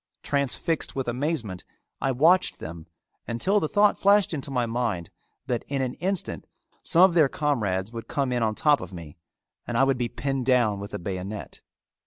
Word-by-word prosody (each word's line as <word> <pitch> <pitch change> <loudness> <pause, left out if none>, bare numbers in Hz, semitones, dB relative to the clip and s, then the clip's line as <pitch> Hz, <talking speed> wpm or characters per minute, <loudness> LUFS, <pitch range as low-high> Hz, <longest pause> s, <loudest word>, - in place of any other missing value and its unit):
Transfixed 145 +3 -1
with 135 -2 -2
amazement, 120 - -2 0.4
I 135 - +1
watched 160 +9 +3
them 80 0 -8 0.4
until 185 - +1
the 155 - -1
thought 205 0 +3
flashed 200 -2 +4
into 140 -2 -4
my 125 -3 0
mind 115 -7 -2 0.3
that 120 -2 -2
in 135 -1 -1
an 125 -1 -2
instant 190 0 -2 0.3
some 170 - +4
of 190 -2 +6
their 155 -5 +5
comrades 110 -10 -1
would 115 -1 -7
come 140 -3 -1
in 120 -1 0
on 110 -1 +1
top 150 +3 +3
of 90 - -8
me 85 -5 -10 0.5
and 120 - -1
I 135 - +5
would 135 -2 +2
be 120 -1 -1
pinned 135 -1 -3
down 120 -6 +3
with 100 +1 -6
a - - -1
bayonet. 95 +3 -6
125 Hz, 185 wpm, -26 LUFS, 110-150 Hz, 0.5 s, of